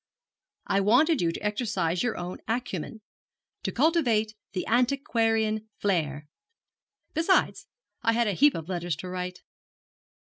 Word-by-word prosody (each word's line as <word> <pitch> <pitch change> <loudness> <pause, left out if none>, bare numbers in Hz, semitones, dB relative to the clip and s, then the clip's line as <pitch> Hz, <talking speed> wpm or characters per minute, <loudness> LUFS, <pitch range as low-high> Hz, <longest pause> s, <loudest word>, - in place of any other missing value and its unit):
'I 195 - +2
wanted 260 - +4
you 170 -1 +2
to - - -6
exercise 205 -6 0
your 245 -2 -1
own 180 +1 -5
acumen, 220 -3 -3 0.6
to - - -2
cultivate 240 -8 +2 0.2
the 185 - -2
antiquarian 225 -3 +1
flair. 155 -7 -1 0.9
Besides, 335 +4 +2 0.3
I 230 -2 +2
had 235 +1 +2
a 205 - 0
heap 290 +8 +4
of 165 -1 -5
letters 175 -3 -2
to 180 +5 -7
write.' 180 0 -5
215 Hz, 130 wpm, -27 LUFS, 180-245 Hz, 0.9 s, wanted